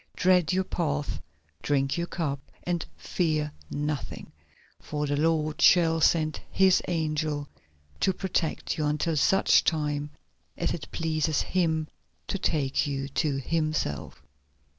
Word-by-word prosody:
Tread 180 Hz, -3 st, +4 dB
your 190 Hz, +1 st, +2 dB
path, 150 Hz, -5 st, -2 dB, 0.4 s
drink 135 Hz, -1 st, +1 dB
your 170 Hz, 0 st, -2 dB
cup, 145 Hz, -7 st, -2 dB, 0.2 s
and 175 Hz, -2 st, -1 dB
fear 155 Hz, -4 st, -1 dB, 0.2 s
nothing, 150 Hz, -1 st, -4 dB, 0.5 s
for 150 Hz, 0 st, -3 dB
the 145 Hz, 0 st, 0 dB
Lord 155 Hz, 0 st, +1 dB
shall 165 Hz, -2 st, +5 dB
send 155 Hz, -1 st, +3 dB
His 190 Hz, -1 st, +4 dB
angel 155 Hz, -3 st, -1 dB, 0.5 s
to 190 Hz, -, +3 dB
protect 180 Hz, -4 st, -2 dB
you 150 Hz, -, +1 dB
until 150 Hz, +2 st, 0 dB
such 195 Hz, +6 st, +4 dB
time 150 Hz, -2 st, 0 dB, 0.5 s
as -, -, 0 dB
it -, -, -6 dB
pleases 155 Hz, -2 st, 0 dB
Him 160 Hz, -4 st, 0 dB, 0.4 s
to 195 Hz, -, -3 dB
take 145 Hz, -5 st, 0 dB
you 140 Hz, -1 st, -3 dB
to 145 Hz, 0 st, 0 dB
Himself." 135 Hz, -, -2 dB
155 Hz, 125 wpm, -27 LUFS, 145-170 Hz, 0.5 s, shall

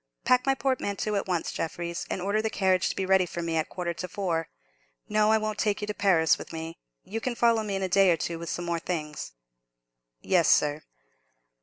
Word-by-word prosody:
Pack 250 Hz, +1 st, +3 dB
my 270 Hz, -, +4 dB
portmanteau 220 Hz, -6 st, -1 dB
at 200 Hz, -1 st, -1 dB
once, 175 Hz, -3 st, -1 dB
Jeffreys, 170 Hz, +1 st, -4 dB
and 180 Hz, -, -3 dB
order 205 Hz, +2 st, +1 dB
the 220 Hz, -, -1 dB
carriage 190 Hz, -3 st, +2 dB
to -, -, -3 dB
be 190 Hz, -, -1 dB
ready 190 Hz, -1 st, +3 dB
for 170 Hz, 0 st, -5 dB
me 165 Hz, -1 st, -2 dB
at 160 Hz, -1 st, 0 dB
a -, -, -32 dB
quarter 175 Hz, -1 st, -3 dB
to 185 Hz, +2 st, -5 dB
four. 175 Hz, -4 st, -2 dB, 0.6 s
No, 215 Hz, 0 st, +3 dB
I 220 Hz, -, +5 dB
won't 215 Hz, -1 st, -3 dB
take 210 Hz, -2 st, +1 dB
you 210 Hz, -, -3 dB
to 210 Hz, -, -3 dB
Paris 180 Hz, -6 st, +3 dB
with -, -, -9 dB
me. 165 Hz, 0 st, -6 dB, 0.2 s
You 225 Hz, +3 st, -5 dB
can 250 Hz, 0 st, -2 dB
follow 230 Hz, -1 st, +3 dB
me 205 Hz, -2 st, -3 dB
in 195 Hz, -, -2 dB
a -, -, +1 dB
day 195 Hz, +1 st, +4 dB
or 170 Hz, -, +4 dB
two 165 Hz, +2 st, -3 dB
with 170 Hz, -, -6 dB
some 175 Hz, -, -3 dB
more 170 Hz, -1 st, -1 dB
things." 150 Hz, -, -4 dB, 0.9 s
"Yes, 175 Hz, -4 st, +2 dB
sir." 150 Hz, +1 st, +3 dB
185 Hz, 225 wpm, -27 LUFS, 170-210 Hz, 0.9 s, I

